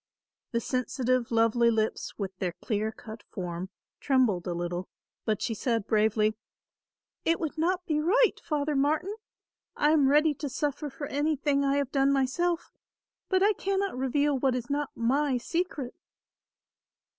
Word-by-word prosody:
The 235 - +1
sensitive 255 0 0
lovely 230 +1 +3
lips 220 -1 -1
with 195 -2 -4
their 180 -2 -1
clear 215 +2 -2
cut 220 0 -10
form, 180 -1 -5 0.3
trembled 245 -11 +2
a 175 - -1
little, 175 +1 -3 0.4
but 215 -3 0
she 230 - -1
said 225 -1 -1
bravely, 215 0 +2 0.9
"It 330 - +2
would 320 -3 -3
not 355 +3 0
be 305 -3 0
right, 430 +10 +3
Father 300 -1 -1
Martin. 310 +9 +1 0.6
I 295 - +3
am 290 -4 +4
ready 300 +2 +4
to 290 0 -5
suffer 290 +3 -2
for 275 +2 -6
anything 290 0 +1
I 275 0 +2
have 280 -2 -1
done 275 0 +3
myself, 325 +6 0 0.6
but 375 0 +3
I 420 +1 +5
cannot 395 -2 -1
reveal 280 +3 +1
what 260 -1 +2
is 245 +1 -4
not 290 0 0
my 265 +3 +1
secret." 300 -2 -3
270 Hz, 150 wpm, -28 LUFS, 230-300 Hz, 0.9 s, I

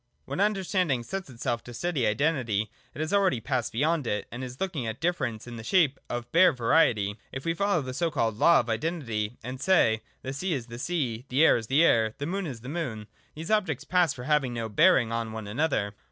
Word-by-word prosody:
When 140 +6 -5
understanding 185 - +1
sets 190 +4 -5
itself 120 -1 -3
to 120 - -10
study 145 -4 0
Identity, 110 -4 0 0.2
it 145 - -4
has 155 +5 -2
already 195 -10 +3
passed 125 0 -2
beyond 150 +2 0
it, 105 -2 -1
and 120 +2 -6
is 125 0 -8
looking 165 -11 -2
at 110 +1 -5
Difference 135 -10 -1
in 120 -1 -8
the 110 - -8
shape 150 -2 +2
of 120 0 -4
bare 185 +2 +6
Variety. 115 -6 +2
If 135 - -6
we 165 - +1
follow 185 -3 +1
the 130 0 -5
so 170 +5 0
called 115 -8 0
law 170 +10 +5
of 120 - -10
Identity, 115 -4 -2
and 125 +3 -6
say, 115 - +3
— - - -38
The 130 - -4
sea 180 +6 -2
is 125 -4 -4
the 120 0 -9
sea. 130 -7 -2
The 140 +6 +4
air - - +6
is 115 -2 -3
the 140 +6 +4
air, 110 -6 +3
The 145 - -4
moon 190 +3 -2
is 125 -6 -7
the 125 - -10
moon, 130 -9 -4 0.3
these 160 +6 -6
objects 185 - +1
pass 180 -2 +2
for 125 - -7
having 135 -3 +1
no 115 -1 -3
bearing 130 - +4
on 115 -1 -3
one 110 -1 -6
another. 105 -3 -1
130 Hz, 225 wpm, -27 LUFS, 115-165 Hz, 0.3 s, bare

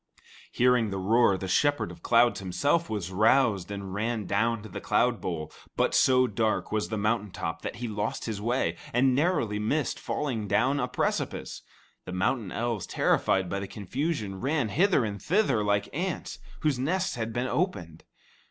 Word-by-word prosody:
Hearing 125 -3 +3
the 95 - -3
roar, 100 +1 +3
the 95 - -5
Shepherd 145 +10 +1
of - - -13
Clouds 120 0 +3
himself 145 - 0
was 100 -4 -3
roused 105 -1 +3
and 100 -2 -6
ran 110 +1 -2
down 115 +3 0
to 110 - -9
the - - -7
cloudbowl; 90 -10 0 0.3
but - - +2
so 130 -1 +5
dark 110 -1 -1
was 105 0 -1
the 110 - -2
mountain 105 0 0
top 80 -2 -5
that - - -5
he 120 0 -4
lost 105 0 -3
his 110 -3 -4
way, 110 -7 0 0.2
and 130 +2 +3
narrowly 130 - +1
missed 140 +9 -1
falling 120 -8 -3
down 130 +8 +2
a 125 - 0
precipice. - - -2 0.4
The 90 - -6
mountain 95 +2 0
elves, 115 -5 -2
terrified 95 -1 +1
by 100 - -2
the 100 - -5
confusion, 105 - -3
ran 140 -4 0
hither 180 - +3
and 100 -1 -5
thither 180 - +2
like 100 0 +1
ants 175 +4 -3 0.2
whose 150 -5 +1
nests 180 +8 0
had 115 -2 -3
been 120 +2 -1
opened. 95 - -2
110 Hz, 170 wpm, -28 LUFS, 100-130 Hz, 0.4 s, so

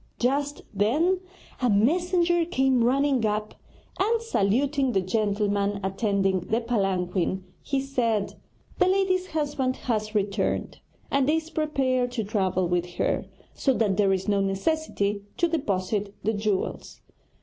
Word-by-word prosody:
Just 280 +4 0
then 295 - +2 0.4
a 250 - +3
messenger 345 - +3
came 265 -7 +2
running 270 0 +2
up 210 0 -1 0.5
and, 455 +4 +2
saluting 270 - +1
the 195 - +3
gentleman 205 0 0
attending 195 -1 +1
the 220 +6 -1
palanquin, 190 -5 -1 0.2
he 275 - -1
said: 235 -6 0 0.5
'The - - +5
lady's 370 -1 +2
husband 285 -5 -1
has 215 -4 -2
returned, 200 -1 -1 0.3
and 275 0 +2
is 320 +1 0
prepared 260 -5 0
to 230 -3 -1
travel 190 -3 0
with 175 0 -1
her, - - 0 0.3
so 270 -2 +1
that 205 -4 +1
there 200 -2 +3
is 190 +1 -1
no 200 -1 +2
necessity 200 0 -1 0.2
to 345 - +3
deposit 205 - -1
the 220 +3 +1
jewels.' 205 -2 -2
225 Hz, 130 wpm, -26 LUFS, 200-285 Hz, 0.5 s, The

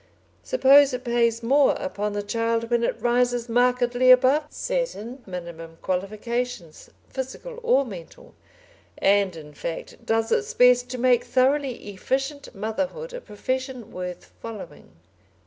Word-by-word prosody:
Suppose 280 - +5
it 250 - -7
pays 235 -1 +1
more 275 +4 +4
upon 210 -7 -3
the 205 0 -2
child 230 +2 -1
when 235 0 +2
it - - -1
rises 245 0 +1
markedly 245 +1 +2
above 260 +4 +6
certain 305 - -3
minimum 170 -3 -8
qualifications, 205 0 -3 0.2
physical 270 - -6
or 460 - +3
mental, 220 - -11 0.6
and, 200 -2 +3
in 150 -2 -11
fact, 165 +3 -7
does 225 0 0
its 455 0 0
best 250 0 +5
to 255 - -4
make 245 -1 +3
thoroughly 255 -1 +1
efficient 270 +7 -3
motherhood 275 - -3
a - - -6
profession 255 - -4
worth 180 -1 -7
following. 210 - -9
245 Hz, 130 wpm, -24 LUFS, 210-265 Hz, 0.6 s, above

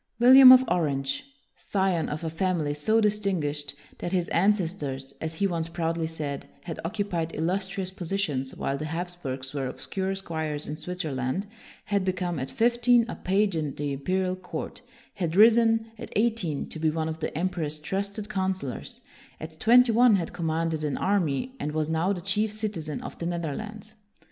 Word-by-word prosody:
William 255 +2 +10
of 255 0 +9
Orange, 140 - 0 0.3
scion 190 -5 0
of 155 +2 -4
a 165 - -1
family 165 -3 0
so 215 +10 +2
distinguished 185 -10 0 0.2
that 175 - -3
his 180 -2 0
ancestors, 165 -8 0
as 160 0 -3
he 200 - 0
once 170 -3 -1
proudly 165 -1 -1
said, 150 -4 -5
had 165 -3 -6
occupied 175 -3 -2
illustrious 190 +3 -2
positions 170 -8 -2
while 140 0 -2
the 155 - -3
Hapsburgs 160 -6 -4
were 135 -2 -2
obscure 190 +8 -3
squires 160 -5 -3
in - - -5
Swit 180 +4 -5
zerland, 135 +2 -2 0.4
had 200 -2 0
become, 180 -3 -1
at 130 - -4
fifteen, 240 0 +3
a - - -5
page 195 0 +1
in 150 -3 -2
the 145 -1 -2
imperial 185 +6 -1
court, 185 -1 -7 0.3
had 170 -4 -2
risen, 225 +1 +5
at - - -8
eighteen, 210 -9 0
to 160 - -7
be 160 0 +2
one 160 0 -1
of 160 0 -4
the - - -3
emperor's 165 -4 -2
trusted 200 +6 -4
coun 190 -2 0
selors, 135 -9 -7 0.4
at 160 0 -9
twenty 245 +1 +6
one 235 -1 +6
had 175 -4 -2
commanded 165 -1 -1
an 150 -2 -1
army, 195 - 0
and 150 - -3
was 155 0 -1
now 160 +4 +1
the 185 -3 -2
chief 205 +3 0
citizen 200 -9 -4
of - - -8
the 170 - -2
Netherlands. 200 +6 -5
175 Hz, 170 wpm, -27 LUFS, 155-200 Hz, 0.4 s, William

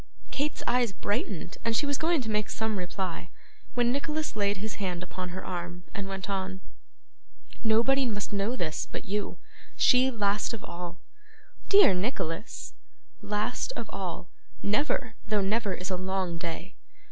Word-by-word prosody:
Kate's 290 +2 -1
eyes 240 -4 +3
brightened, 200 -3 -2
and 230 0 +2
she 290 - +3
was 285 -1 +1
going 325 -2 +3
to 220 -3 -2
make 210 -1 +1
some 220 -3 0
reply, 180 -1 -3 0.5
when 240 -1 +4
Nicholas 300 +3 -1
laid 205 -1 +2
his 210 +1 -4
hand 180 -2 -1
upon 180 0 -5
her 185 +1 -5
arm, 175 -1 -4
and 200 -1 -3
went 195 -1 -4
on: 190 -1 -2 1.0
'Nobody 235 +5 +5
must 205 -2 -2
know 205 +5 +1
this 160 -10 -1
but - - -4
you. 205 +2 -1 0.4
She, 255 0 +6
last 210 -2 +1
of 215 - -9
all.' 175 0 -6 0.7
'Dear 395 - +8
Nicholas!' 185 -1 -2 0.5
'Last 210 +4 -1
of 225 -2 -5
all; 180 -2 -4 0.4
never, 250 +2 +1
though 210 -1 +3
never 200 0 +1
is 185 +1 -4
a 185 - +1
long 185 -2 -1
day. 170 +2 -4
205 Hz, 155 wpm, -29 LUFS, 185-235 Hz, 1.0 s, Dear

